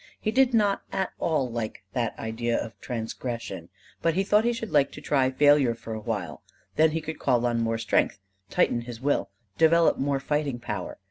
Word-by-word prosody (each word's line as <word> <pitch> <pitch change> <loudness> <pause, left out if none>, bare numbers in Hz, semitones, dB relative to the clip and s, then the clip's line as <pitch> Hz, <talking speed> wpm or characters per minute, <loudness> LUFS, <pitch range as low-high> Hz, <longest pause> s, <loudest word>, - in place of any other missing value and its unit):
He 215 - -1
did 265 +1 +4
not 210 -4 +2
at 190 -1 -1
all 150 -6 +1
like 110 -4 -4
that 115 -3 -1
idea 115 +1 -1
of 115 - -5
transgression; 115 0 -5 0.3
but 165 -1 +1
he 195 - +2
thought 210 +3 +3
he 240 - +3
should 230 -2 -5
like 145 -2 +3
to - - -8
try 135 -3 +2
failure 145 -3 +4
for 115 0 -7
a 110 - -4
while; 100 - -4 0.3
then 160 +1 +5
he 160 +1 -2
could 160 0 -6
call 125 -3 +2
on 120 -1 +1
more 115 0 0
strength, 110 -2 +1 0.3
tighten 120 - +2
his 120 -1 -8
will, 145 +3 0 0.3
develop 165 +1 +5
more 140 0 0
fighting 145 -2 -1
power. 120 - -5
130 Hz, 195 wpm, -26 LUFS, 115-160 Hz, 0.3 s, then